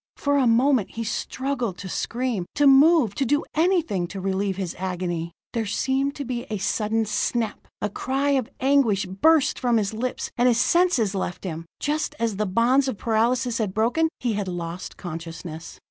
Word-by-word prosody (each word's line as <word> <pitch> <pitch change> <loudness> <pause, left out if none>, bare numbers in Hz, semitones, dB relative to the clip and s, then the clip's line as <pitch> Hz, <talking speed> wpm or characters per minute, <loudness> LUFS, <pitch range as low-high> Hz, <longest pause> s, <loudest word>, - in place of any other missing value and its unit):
For 285 0 +1
a 260 - +3
moment 240 -1 +3
he 230 - -3
struggled 250 -2 -3
to 190 - -7
scream, 230 -1 -2
to 290 - +3
move, 280 - +6
to 275 - -1
do 290 +3 +1
anything 315 - +1
to 195 - -7
relieve 190 0 -1
his 185 -4 -4
agony. 175 -2 -3 0.2
There 225 -2 -1
seemed 270 +6 0
to 285 - -5
be 245 0 -4
a 215 - -2
sudden 220 +3 0
snap 220 +1 -2 0.2
a - - +2
cry 270 +6 -1
of 265 -5 +1
anguish 260 -7 +3
burst 275 - +3
from 240 -2 +2
his 210 -1 -1
lips 245 +3 -3
and 245 - +5
his 235 -2 +3
senses 340 - +3
left 185 -2 -3
him. 165 -3 -5
Just 300 +1 -1
as 225 -4 -1
the 210 0 0
bonds 245 +8 +3
of 260 - -2
paralysis 235 +3 +1
had 205 -4 -2
broken, 245 +9 +2
he 240 -3 -1
had 205 -2 -2
lost 175 0 -5
consciousness. 165 -1 -7
230 Hz, 180 wpm, -24 LUFS, 190-265 Hz, 0.2 s, move